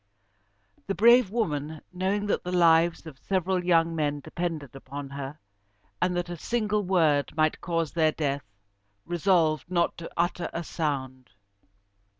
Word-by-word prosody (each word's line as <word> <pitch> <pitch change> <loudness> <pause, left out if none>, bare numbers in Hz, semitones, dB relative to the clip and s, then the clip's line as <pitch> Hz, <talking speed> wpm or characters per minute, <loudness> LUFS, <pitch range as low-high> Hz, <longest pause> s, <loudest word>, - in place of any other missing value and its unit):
The 195 - -1
brave 235 +2 +6
woman, 155 -8 -2
knowing 190 +3 -1
that 205 - 0
the 180 - -4
lives 170 -1 +4
of 145 -4 -10
several 185 0 0
young 165 -2 +3
men 145 -2 0
depended 155 -4 -5
upon 140 +1 -8
her, 140 +1 -6 0.6
and 180 -1 +1
that 175 - -1
a 175 0 -6
single 210 +2 0
word 165 -7 +2
might 155 0 +2
cause 165 -3 -1
their 160 -2 +2
death, 140 -8 -3 0.5
resolved 170 -2 +1
not 170 -2 +1
to 165 - -7
utter 175 +1 0
a 170 - -3
sound. 130 - -3
165 Hz, 145 wpm, -27 LUFS, 150-180 Hz, 0.6 s, brave